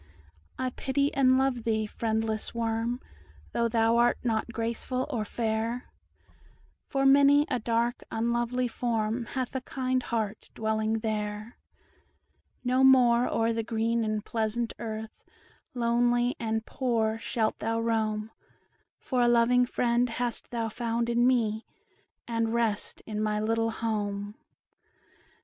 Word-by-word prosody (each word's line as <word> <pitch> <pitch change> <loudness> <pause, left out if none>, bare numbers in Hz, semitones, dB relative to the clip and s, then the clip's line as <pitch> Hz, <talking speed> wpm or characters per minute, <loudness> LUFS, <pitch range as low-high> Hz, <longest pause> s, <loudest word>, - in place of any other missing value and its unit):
I 255 0 -1
pity 280 +3 0
and 260 -1 +4
love 265 -3 +1
thee, 220 -1 0
friendless 220 0 -2
worm, 230 +1 -1 0.5
Though 235 0 +1
thou 230 0 +2
art 240 0 +4
not 230 -1 -1
graceful 235 +3 -2
or 230 -5 -1
fair; 225 +2 -2 1.0
For 275 -1 0
many 280 +1 +6
a - - +1
dark, 235 +2 0
unlovely 235 +2 0
form, 230 -1 -1
Hath 260 0 -4
a 265 - -1
kind 255 0 -1
heart 220 -3 -3
dwelling 220 0 0
there; 215 0 -3 1.1
No 255 +1 +2
more 250 -2 +6
o'er 230 0 +1
the 225 - -1
green 230 +1 0
and 215 -1 -2
pleasant 225 +1 -1
earth, 220 -1 -6 0.5
Lonely 240 +1 +2
and 225 -1 -2
poor, 225 -4 0
shalt 225 -1 -1
thou 225 +1 -1
roam, 220 -1 -1 0.7
For 255 -2 -1
a 240 - +4
loving 240 +1 +4
friend 240 0 +1
hast 240 0 -3
thou 230 -2 -2
found 235 +1 -2
in 240 +1 +3
me, 225 -3 +1 0.6
And 230 -1 0
rest 225 -3 -1
in 215 -1 -3
my 210 0 0
little 225 +1 +1
home." 205 -2 -3
230 Hz, 130 wpm, -28 LUFS, 220-245 Hz, 1.1 s, many